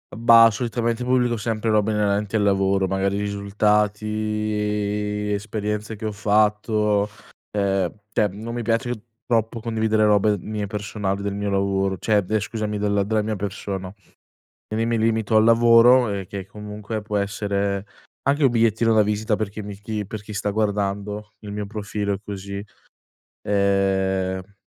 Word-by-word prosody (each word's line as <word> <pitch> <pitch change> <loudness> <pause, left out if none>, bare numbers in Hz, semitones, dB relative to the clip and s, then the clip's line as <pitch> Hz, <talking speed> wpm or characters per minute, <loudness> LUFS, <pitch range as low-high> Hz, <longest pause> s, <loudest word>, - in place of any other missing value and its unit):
Mhmm, 115 +2 -9
bah, 115 -1 +9
solitamente 115 +1 -2
pubblico 125 -2 +2
sempre 110 0 -2
robe 110 0 +2
inerenti 105 0 0
al 105 - +2
lavoro, 95 -1 +2
magari 95 +1 0
risultati, 105 0 -1
esperienze 105 +1 -3
che 110 +1 -7
ho 110 - -1
fatto, 105 0 +2 0.4
ehm, 95 -3 0 0.2
cioè 105 - +2
non 110 +5 -7
mi 120 - -3
piace 115 +2 0 0.3
troppo 115 -1 0
condividere 110 -1 +1
robe 105 0 +3
mie 105 +2 -4
personali, 100 -1 -3
del 100 0 -2
mio 100 0 -2
lavoro 95 -1 0
cioè 105 -3 +2
scusami 105 0 -3
della 100 -1 +1
della 110 +2 +1
mia 110 0 -2
persona. 95 -1 -5 0.8
Quindi 110 +1 0
mi 115 0 +1
limito 110 -1 +1
al 110 - +6
lavoro 115 +1 +6
e 100 -2 -3
che 95 0 -6
comunque 105 +1 -6
può 105 0 -3
essere 100 -1 -1 0.4
anche 140 +2 +2
un 135 - +6
bigliettino 115 -1 +2
da 110 - +6
visita 105 +1 0
per 110 -1 -2
chi 105 +1 -7
mi 100 -1 -7 0.3
per 110 0 -7
chi 105 - -9
sta 105 0 -1
guardando 105 0 -2
il 105 -1 -8
mio 105 0 -4
profilo 100 -1 -3
così, 100 0 -6 0.8
ehm 95 -1 0
105 Hz, 150 wpm, -23 LUFS, 100-110 Hz, 0.8 s, bah